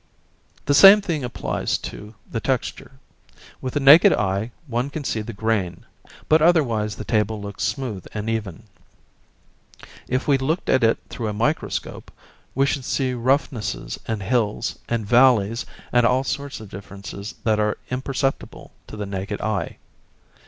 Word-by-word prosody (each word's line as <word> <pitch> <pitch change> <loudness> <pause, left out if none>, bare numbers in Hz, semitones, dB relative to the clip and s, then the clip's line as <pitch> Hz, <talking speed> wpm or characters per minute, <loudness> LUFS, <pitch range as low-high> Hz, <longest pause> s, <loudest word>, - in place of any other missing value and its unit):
The 145 - +2
same 195 +8 +9
thing 170 -8 -3
applies 120 - -2
to 105 +2 -9
the 115 - -3
texture. 130 +2 -3 0.7
With 130 - -5
the - - +2
naked 145 +4 +8
eye 100 +3 -1 0.2
one 125 0 -2
can 145 +1 -5
see 110 -4 -2
the 105 - -6
grain, 100 -5 -2 0.4
but 155 0 +4
otherwise 120 -11 +2
the - - -7
table 110 -1 0
looks 100 -1 -6
smooth 120 -10 -3
and 105 0 -5
even. 110 -3 -3 1.4
If 130 +2 -1
we 140 -2 +3
looked 155 +6 -1
at 130 -2 +3
it 115 0 +4
through 115 - -4
a 105 - -2
microscope, 120 +9 -2 0.5
we 135 +1 +3
should 140 -1 -1
see 130 0 -1
roughnesses 120 - -1
and 110 -3 -2
hills 110 -1 -1
and 115 -2 -1
valleys, 115 -1 +3 0.2
and 120 0 +4
all 125 +3 +3
sorts 140 0 -4
of 110 -2 -11
differences 100 +1 -8
that 110 -2 +2
are 105 0 0
imperceptible 135 +1 -3 0.2
to - - -9
the 105 - -3
naked 100 +1 -4
eye. 110 -2 -2
115 Hz, 150 wpm, -22 LUFS, 105-135 Hz, 1.4 s, same